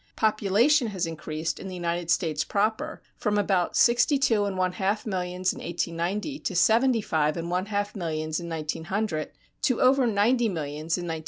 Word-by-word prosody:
Population 220 +6 +3
has 190 -4 -2
increased 160 0 -4
in - - -7
the 185 - -6
United 170 -1 -2
States 160 -4 +1
proper 220 +10 -1
from 210 -2 0
about 190 -3 +1
sixty 245 +4 +4
two 225 -6 +2
and 195 -2 -3
one 185 -1 +1
half 195 +3 -1
millions 185 -2 -1
in - - -9
1890 175 - -3
to - - -4
seventy 230 +5 +4
five 155 -5 0
and 170 +1 -4
one 180 +2 -1
half 205 0 -2
millions 155 -3 -2
in 170 -1 -7
1900 165 +4 -2
and 155 - -5 0.3
to 255 - +1
over 260 0 +4
ninety 230 +3 +2
millions 155 -1 -3
in 175 - -4
1910. 165 -2 -3
185 Hz, 180 wpm, -26 LUFS, 165-220 Hz, 0.3 s, sixty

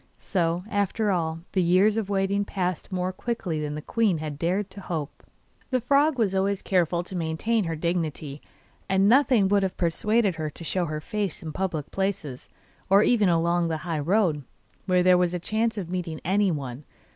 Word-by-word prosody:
So, 175 -2 -1
after 205 +1 0
all, 165 -3 -1
the 190 - +1
years 185 +5 +4
of 220 -3 -2
waiting 200 0 +1
passed 185 -3 -3
more 185 0 -1
quickly 185 -8 -3
than 150 0 -3
the 150 - -6
queen 215 -5 +1
had 150 -2 -5
dared 185 +4 -1
to 200 - -10
hope. 155 -6 -5 0.5
The 255 - +1
frog 280 +4 +3
was 210 -5 +1
always 195 +1 0
careful 175 -2 +1
to 185 - -9
maintain 180 +6 0
her 165 -1 -2
dignity, 155 -3 -3 0.5
and 190 +1 +3
nothing 250 -4 +4
would 200 0 +3
have 190 -1 -2
persuaded 195 +3 +1
her 155 -1 -2
to 160 - -10
show 180 +2 0
her 155 0 -4
face 200 -1 -3
in 160 - -5
public 170 -6 -3
places, 190 -9 -3 0.4
or 200 +2 +6
even 215 -6 +3
along 170 0 +2
the 160 -1 -1
high 165 -3 -1
road, 165 -2 +1 0.4
where 180 -1 +3
there 180 0 +5
was 180 0 +1
a - - -2
chance 220 +4 -1
of 190 -5 -3
meeting 170 -4 -3
anyone. 155 -9 0
180 Hz, 185 wpm, -26 LUFS, 165-200 Hz, 0.5 s, or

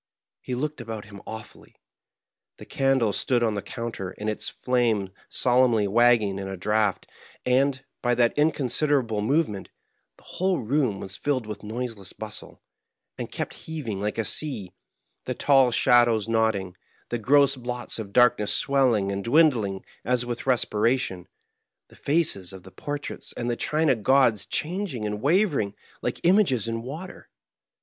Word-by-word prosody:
He 125 - -4
looked 150 +1 -3
about 110 -3 -6
him 100 -1 -12
awfully. 110 -1 -10 0.8
The - - -11
candle 135 -6 +1
stood 120 +2 +1
on 110 -2 +1
the 100 - -3
counter, 115 -6 -6
its 110 0 -3
flame 115 -6 0 0.2
solemnly 120 -4 +3
wagging 110 -2 +3
in 95 - -5
a 95 0 -5
draught; 105 +1 0 0.4
and, 130 +1 +2 0.2
by 120 -1 +2
that 120 -1 +2
inconsiderable 145 -5 +1
movement, 110 -4 0 0.5
the - - -22
whole 185 0 -1
room 125 -4 0
was 95 0 -6
filled 135 -5 -1
with 105 -1 -7
noiseless 110 -3 -5
bustle, 110 -1 -8 0.6
and - - -5
kept - - -4
heaving 130 -12 -6
like 105 +1 -2
a 115 - 0
sea; 105 -10 -1 0.5
the - - -3
tall 135 -3 +4
shadows 120 -2 +4
nodding, 110 -5 0 0.3
the 120 - -2
gross 140 +4 +4
blots 125 -2 -4
of 100 -3 -6
darkness 120 -3 +4
swelling 125 -8 +2
and 100 0 -3
dwindling 115 -8 +2 0.2
as 125 +2 +1
with 120 +1 -5
respiration, 115 -5 +1 0.6
the - - -18
faces 140 - 0
of 95 -2 -11
the 95 - -13
por 145 -1 -4
traits 145 - -7
and 120 0 -2
the - - -1
china 155 +1 +1
gods 120 -1 +3
changing 160 - -2
and 105 0 -3
wavering 145 - +2 0.3
like - - -3
images 170 - +3
in 115 0 -2
water. 155 +10 -8
120 Hz, 150 wpm, -25 LUFS, 105-135 Hz, 0.8 s, tall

